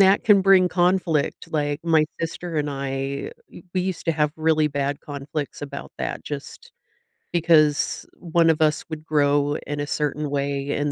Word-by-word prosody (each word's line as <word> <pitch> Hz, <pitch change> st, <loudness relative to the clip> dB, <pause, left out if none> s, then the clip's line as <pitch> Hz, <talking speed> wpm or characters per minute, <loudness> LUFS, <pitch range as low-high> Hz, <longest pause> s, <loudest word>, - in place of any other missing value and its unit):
that 195 Hz, +1 st, +5 dB
can 205 Hz, -3 st, +6 dB
bring 190 Hz, -1 st, +6 dB
conflict. 175 Hz, -4 st, 0 dB
Like, 145 Hz, -1 st, -1 dB
my 160 Hz, -2 st, +4 dB, 0.2 s
sister 165 Hz, 0 st, -4 dB
and 150 Hz, -1 st, 0 dB
I 135 Hz, 0 st, -3 dB, 0.2 s
w -, -, -13 dB
we 185 Hz, -, +2 dB
used 185 Hz, -1 st, -3 dB
to 165 Hz, -, +3 dB
have 150 Hz, -1 st, +1 dB
really 155 Hz, -1 st, +2 dB
bad 140 Hz, +1 st, -2 dB
conflicts 145 Hz, 0 st, -5 dB
about 140 Hz, -1 st, -7 dB
that -, -, -4 dB
just 150 Hz, -, -8 dB, 0.6 s
because 155 Hz, -3 st, +3 dB
one 170 Hz, -1 st, +2 dB
of 160 Hz, 0 st, -2 dB
us 155 Hz, -1 st, +2 dB
would 155 Hz, -1 st, -6 dB
grow 145 Hz, -1 st, +2 dB
in 145 Hz, 0 st, -3 dB
a 145 Hz, -, -2 dB
certain 150 Hz, 0 st, -1 dB
way 140 Hz, 0 st, -2 dB
and 145 Hz, 0 st, -1 dB
150 Hz, 170 wpm, -23 LUFS, 145-165 Hz, 0.6 s, can